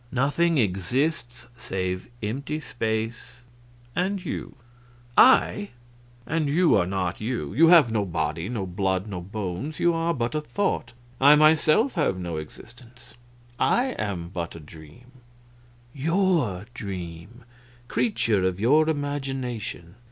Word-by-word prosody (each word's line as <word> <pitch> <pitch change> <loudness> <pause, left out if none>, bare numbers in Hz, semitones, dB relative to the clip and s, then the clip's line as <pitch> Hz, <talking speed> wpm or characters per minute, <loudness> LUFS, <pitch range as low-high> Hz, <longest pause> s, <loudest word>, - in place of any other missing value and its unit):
Nothing 145 +6 +1
exists 120 - -1
save 95 -3 -3
empty 140 +8 -3
space 115 -2 -4 0.5
and 190 +1 -1
you!" 150 - -5 0.6
"I!" 205 -4 +5 0.6
"And 155 -2 -1
you 170 +3 +4
are 90 -4 +2
not 95 -1 -2
you 110 - -3
you 165 +2 +5
have 165 -9 +7
no 110 -2 +1
body, 85 0 -2
no 110 -6 -3
blood, 95 +1 -1
no 95 -4 -6
bones, 100 - -5
you 170 0 +3
are 165 +1 0
but 120 0 -2
a 155 - -1
thought. 150 -8 -2 0.3
I 145 +2 +8
myself 155 - +4
have 150 - 0
no 85 -3 -4
existence; 120 - -12 0.5
I 260 +2 +2
am 90 -5 -3
but 85 -2 -5
a - - -8
dream 80 +10 -15 0.8
your 155 - +1
dream, 95 +1 -7 0.4
creature 115 - +1
of 95 0 0
your 150 +8 +4
imagination. 135 - -4
120 Hz, 125 wpm, -25 LUFS, 95-155 Hz, 0.8 s, I